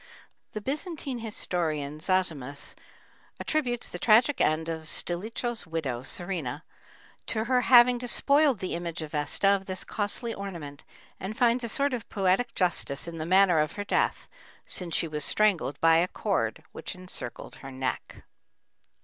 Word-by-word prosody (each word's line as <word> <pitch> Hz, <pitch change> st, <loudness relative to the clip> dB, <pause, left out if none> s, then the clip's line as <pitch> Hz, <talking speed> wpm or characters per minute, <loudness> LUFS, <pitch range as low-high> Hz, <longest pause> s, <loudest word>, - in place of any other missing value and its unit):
The 215 Hz, -, -4 dB
Byzantine 280 Hz, -, -4 dB
historian 160 Hz, -9 st, -3 dB
Zosimus 155 Hz, -6 st, -1 dB, 0.7 s
attributes 250 Hz, -6 st, -1 dB
the 175 Hz, -, -7 dB
tragic 235 Hz, +7 st, +4 dB
end 155 Hz, +1 st, +2 dB
of 160 Hz, -1 st, -4 dB
Stilicho's 220 Hz, +8 st, -2 dB
widow, 145 Hz, -7 st, -3 dB
Serena, 160 Hz, -1 st, -4 dB, 0.6 s
to 220 Hz, -2 st, 0 dB
her 250 Hz, +1 st, +2 dB
having 245 Hz, 0 st, +6 dB
despoiled 280 Hz, +1 st, +3 dB
the 185 Hz, -, -3 dB
image 170 Hz, -1 st, -4 dB
of 150 Hz, -, -8 dB
Vesta 150 Hz, +6 st, +2 dB
of 195 Hz, -1 st, +1 dB
this 185 Hz, -1 st, 0 dB
costly 225 Hz, +3 st, 0 dB
ornament, 170 Hz, -9 st, -7 dB, 0.4 s
and 210 Hz, +4 st, -5 dB
finds 245 Hz, 0 st, +3 dB
a 235 Hz, -, -2 dB
sort 280 Hz, +4 st, +1 dB
of 235 Hz, -2 st, -5 dB
poetic 195 Hz, +4 st, +1 dB
justice 175 Hz, -5 st, 0 dB
in 165 Hz, -1 st, -6 dB
the 155 Hz, -, -3 dB
manner 185 Hz, -2 st, +5 dB
of 155 Hz, 0 st, 0 dB
her 205 Hz, -, -5 dB
death, -, -, 0 dB, 0.4 s
since 175 Hz, -3 st, -1 dB
she 165 Hz, -, +2 dB
was 150 Hz, -1 st, -2 dB
strangled 190 Hz, -9 st, +2 dB
by 165 Hz, 0 st, +6 dB
a 175 Hz, +2 st, +3 dB
cord -, -, -2 dB
which -, -, -6 dB
encircled 180 Hz, -9 st, -7 dB
her 135 Hz, -, -9 dB
neck. 130 Hz, 0 st, -4 dB
185 Hz, 150 wpm, -28 LUFS, 160-230 Hz, 0.7 s, having